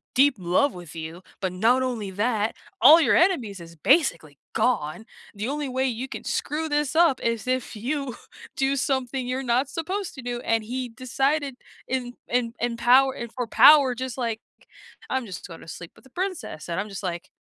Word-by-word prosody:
deep 275 0 +5
love 185 +11 +2
with 175 -3 -10
you, 160 +2 -7 0.2
but 185 -2 -1
not 240 +7 +3
only 230 -6 -3
that, 215 +1 0 0.3
all 310 +7 +9
your 240 - +4
enemies 255 - +2
is 170 0 -12
basically 170 - +2 0.2
gone. 220 -3 0 0.3
The 210 +4 -3
only 295 0 -2
way 260 +1 0
you 250 +2 -3
can - - -7
screw 315 +1 -2
this 295 0 0
up 330 -6 +4
is 230 0 -1
if 255 -2 -1
you 260 +3 -3 0.4
do 270 0 +1
something 260 -1 -1
you're 260 +1 -2
not 255 +3 +1
supposed 370 +2 -4
to 260 - -8
do," 245 0 -3
and 225 -1 0
he 250 +2 -4
decided 270 +4 -1 0.3
in 250 -2 -2 0.2
in 240 -1 0
in 235 -1 -1
power 260 +3 +5
and 235 -1 -6
for 245 -1 -3
power 280 0 +7
just 260 0 -5
like, 230 -3 -2 0.7
"I'm 260 -2 -1
just 185 -4 -8
gonna 165 -1 -11
sleep 170 +1 -9
with - - -20
the - - -17
princess," 365 - -4
and 170 - -1
I'm 210 - -3
just 195 0 -7
like, 175 -2 -4
250 Hz, 190 wpm, -25 LUFS, 215-270 Hz, 0.7 s, all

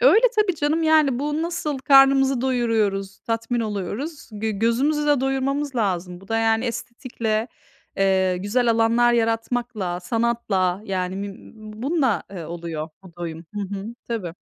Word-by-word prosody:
Öyle, - - +6
tabii 420 -4 +3
canım, 295 +3 +1
yani, 310 -5 +4
bu 295 +3 -1
nasıl 310 -4 -2
karnımızı 270 -1 +5
doyuruyoruz, 220 -6 0
tatmin 230 0 -2
oluyoruz, 220 - -4
gö 215 +1 -2
gözümüzü 250 +8 +1
de 290 -3 +3
doyurmamız 270 +1 -1
lazım. 180 -5 -1
Bu 195 - -17
da, 225 - +1
yani, 225 +1 +2
estetikle, 235 -2 -3 0.5
eee, 190 -1 +2
güzel 225 +6 +1
alanlar 230 +1 +3
yaratmakla, 225 -5 -1
sanatla, 200 -3 0
yani, 185 -2 -2
müm 200 0 -8 0.3
bununla, 275 -5 +1
eee, 180 -4 -7
oluyor 165 -1 -5
bu 180 -3 -15
doyum. 165 -1 -6
Hı 205 - -3 0.2
hı. 195 +1 -6 0.2
Tabii. 190 -8 -4
230 Hz, 140 wpm, -23 LUFS, 195-270 Hz, 0.5 s, Öyle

